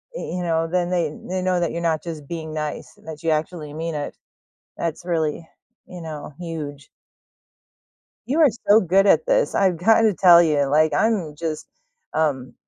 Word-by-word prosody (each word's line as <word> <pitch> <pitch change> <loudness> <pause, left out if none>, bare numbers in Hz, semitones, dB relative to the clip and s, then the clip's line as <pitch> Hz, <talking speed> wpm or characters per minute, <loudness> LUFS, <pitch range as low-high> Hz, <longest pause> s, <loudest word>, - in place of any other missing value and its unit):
y - - -5 0.2
you 180 - -3
know, 165 -1 0
then 175 +1 -1
they 170 -4 0 0.2
they 185 0 -2
know 185 -1 +1
that 170 - 0
you're 170 - -4
not 160 -2 0
just 160 -4 -7
being 160 -1 -6
nice, 150 -1 -5
that 160 0 -9
you 165 - 0
actually 155 -1 -2
mean 165 0 -4
it. 145 - -5 0.6
That's 170 +1 -4
really, 160 -1 -2 0.4
you 180 -1 -10
know, 150 -3 -8
huge. 150 -5 -7 1.4
You 290 +6 +1
are 300 - +7 0.2
so 210 +2 +6
good 195 +3 +3
at 335 - +4
this, - - +1
I've 190 -3 +2
gotta 220 +4 +4
tell 175 -2 +7
you, 150 -3 +2
like, 150 +2 +2
I'm 185 -3 +1
just, 155 0 -5 0.5
um, 140 -5 -1
165 Hz, 175 wpm, -22 LUFS, 155-180 Hz, 1.4 s, are